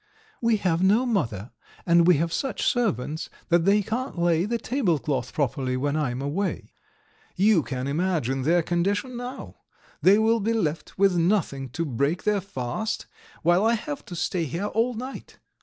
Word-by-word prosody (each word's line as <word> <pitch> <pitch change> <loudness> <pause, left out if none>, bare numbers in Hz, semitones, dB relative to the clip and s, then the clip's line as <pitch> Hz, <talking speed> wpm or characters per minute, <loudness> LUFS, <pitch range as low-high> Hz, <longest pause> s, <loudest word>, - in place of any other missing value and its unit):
We 230 -2 +3
have 180 -4 0
no 210 +7 +4
mother, 125 - -1 0.3
and 170 -1 +5
we 180 - +7
have 165 +2 -1
such 270 - -2
servants 160 - 0 0.2
that 170 -1 +3
they 205 +1 +4
can't 245 +3 -3
lay 170 0 +2
the 235 +3 -1
tablecloth 170 - -1
properly 130 -2 -1
when 140 +3 -1
I 150 -4 0
am 125 +2 -4
away. 180 +8 -3 0.6
You 195 -1 +4
can 130 -3 -4
imagine 145 -4 0
their 165 +5 +3
condition 200 +9 -1
now! 245 +2 -7 0.4
They 195 +3 +6
will 225 +1 +3
be 225 +2 0
left 160 -8 -2
with 195 -1 +4
nothing 165 -7 0
to 165 - 0
break 140 +5 -1
their 210 -2 +1
fast, 185 - -4 0.4
while 175 +4 +4
I 230 +1 +3
have 150 -10 -5
to 175 - -8
stay 170 0 -1
here 170 +7 -3
all 230 +4 0
night. 255 +4 -8
175 Hz, 170 wpm, -25 LUFS, 150-215 Hz, 0.6 s, we